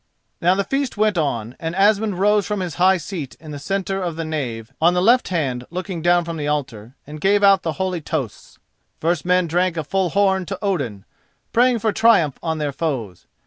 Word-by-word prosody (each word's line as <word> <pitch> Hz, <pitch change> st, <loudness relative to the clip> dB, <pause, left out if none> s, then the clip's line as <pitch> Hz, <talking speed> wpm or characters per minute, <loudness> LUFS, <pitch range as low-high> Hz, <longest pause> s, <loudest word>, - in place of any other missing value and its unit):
Now 180 Hz, +2 st, +4 dB
the 200 Hz, -, 0 dB
feast 270 Hz, 0 st, -2 dB
went 215 Hz, -1 st, +2 dB
on, 125 Hz, -7 st, -2 dB
and 165 Hz, +1 st, -4 dB
Asmund 205 Hz, 0 st, +2 dB
rose 205 Hz, +1 st, +2 dB
from 210 Hz, -2 st, -2 dB
his 180 Hz, -3 st, -4 dB
high 190 Hz, +1 st, +5 dB
seat 165 Hz, -5 st, -6 dB
in 155 Hz, -1 st, -10 dB
the 145 Hz, -, -6 dB
centre 195 Hz, +4 st, -2 dB
of 175 Hz, -3 st, -3 dB
the 165 Hz, 0 st, -4 dB
nave, 120 Hz, -8 st, -4 dB
on 175 Hz, +2 st, +4 dB
the -, -, +2 dB
left 235 Hz, +7 st, +4 dB
hand 130 Hz, -8 st, -2 dB
looking 180 Hz, 0 st, -5 dB
down 175 Hz, +1 st, +3 dB
from 165 Hz, -1 st, -5 dB
the 145 Hz, -1 st, -3 dB
altar, 135 Hz, -5 st, -3 dB
and 150 Hz, +1 st, -9 dB
gave 205 Hz, +2 st, +3 dB
out 195 Hz, -1 st, +6 dB
the 160 Hz, -, -2 dB
holy 185 Hz, -2 st, -2 dB
toasts. 145 Hz, -, -5 dB, 0.4 s
First 170 Hz, 0 st, 0 dB
men 180 Hz, 0 st, +3 dB
drank 175 Hz, +1 st, 0 dB
a 160 Hz, -, -1 dB
full 190 Hz, +4 st, 0 dB
horn 190 Hz, -1 st, +1 dB
to 195 Hz, -, -4 dB
Odin, 140 Hz, -, -2 dB, 0.5 s
praying 245 Hz, +1 st, +4 dB
for 220 Hz, -1 st, 0 dB
triumph 205 Hz, -, +3 dB
on 160 Hz, -1 st, -2 dB
their 150 Hz, -2 st, -2 dB
foes. 130 Hz, -, -4 dB
175 Hz, 210 wpm, -21 LUFS, 150-195 Hz, 0.5 s, out